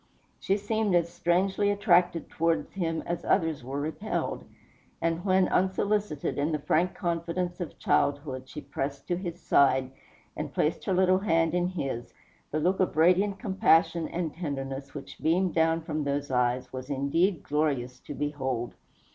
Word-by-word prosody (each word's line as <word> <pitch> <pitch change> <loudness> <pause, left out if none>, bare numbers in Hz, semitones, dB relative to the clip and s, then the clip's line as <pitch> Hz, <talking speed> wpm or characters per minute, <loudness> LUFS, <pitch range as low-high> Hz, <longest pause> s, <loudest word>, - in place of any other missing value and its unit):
She 195 - +1
seemed 210 -1 0
as 170 0 +1
strangely 190 +4 +1
attracted 180 -5 +3
towards 165 0 0
him 165 -4 -2
as 170 - -3
others 160 -8 +1
were 135 +3 -4
repelled; 160 +9 -3 0.5
and 165 +1 -1
when, 190 -1 +3
unsolicited, 190 -5 0
in 145 +3 +1
the 155 - +1
frank 170 +4 +1
confidence 175 +1 -2
of 175 - -6
childhood 140 -2 0
she 150 - -7
pressed 140 -1 -5
to 175 - +2
his 175 -1 -5
side, 130 -2 +3 0.4
and - - -4
placed 155 - 0
her 190 - +1
little 185 0 +4
hand 165 -4 +2
in 180 0 +1
his, 135 -10 -4 0.3
the 155 - -1
look 180 +5 +1
of 185 -4 0
radiant 185 +5 +4
compassion 175 -5 +3
and 170 -3 -3
tenderness 135 -4 -5
which - - -8
beamed 175 +3 +2
down 165 0 +2
from 155 -1 -2
those 140 0 -2
eyes 125 0 0
was 130 +1 -6
indeed 155 +7 +1
glorious 140 -5 -1
to 145 - -8
behold. 135 -5 -2
165 Hz, 155 wpm, -28 LUFS, 140-185 Hz, 0.5 s, little